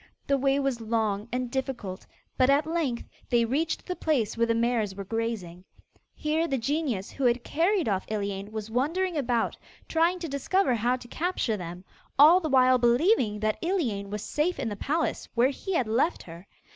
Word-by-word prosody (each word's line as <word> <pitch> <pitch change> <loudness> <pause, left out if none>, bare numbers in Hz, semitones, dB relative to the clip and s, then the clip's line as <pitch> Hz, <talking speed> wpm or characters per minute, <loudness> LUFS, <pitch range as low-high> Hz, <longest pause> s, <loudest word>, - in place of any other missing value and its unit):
The 280 - +2
way 275 +1 +2
was 270 -4 -1
long 220 -2 -1
and 250 0 -2
difficult, 245 -8 -4 0.3
but 255 0 +3
at 285 +2 +4
length 315 -7 -1 0.3
they 235 -1 +3
reached 295 +8 -1
the 360 - -3
place 275 -12 0
where 230 0 +2
the 230 - +2
mares 230 -4 0
were 200 - -5
grazing. 200 -5 -4 0.5
Here 315 +2 0
the 270 - 0
genius 260 -5 -2
who 275 - -5
had 240 0 +2
carried 345 - +1
off 195 -3 -1
Iliane 200 -1 -3
was 220 0 -6
wandering 330 +9 0
about, 245 -5 0 0.3
trying 335 +3 +2
to 345 -2 -5
discover 280 +3 +1
how 240 +2 +1
to 250 -1 -10
capture 320 -6 -1
them, 180 -1 -7 0.3
all 310 +6 +8
the 320 -4 -3
while 255 -1 +5
believing 240 - +3
that 215 0 -1
Iliane 255 - -1
was 210 0 -4
safe 310 +5 -1
in 265 -4 -2
the 205 - -4
palace 310 +10 -2
where 245 +3 +4
he 370 +7 -4
had 255 -8 +1
left 250 +10 +1
her. 170 +3 -12
250 Hz, 185 wpm, -27 LUFS, 220-305 Hz, 0.5 s, all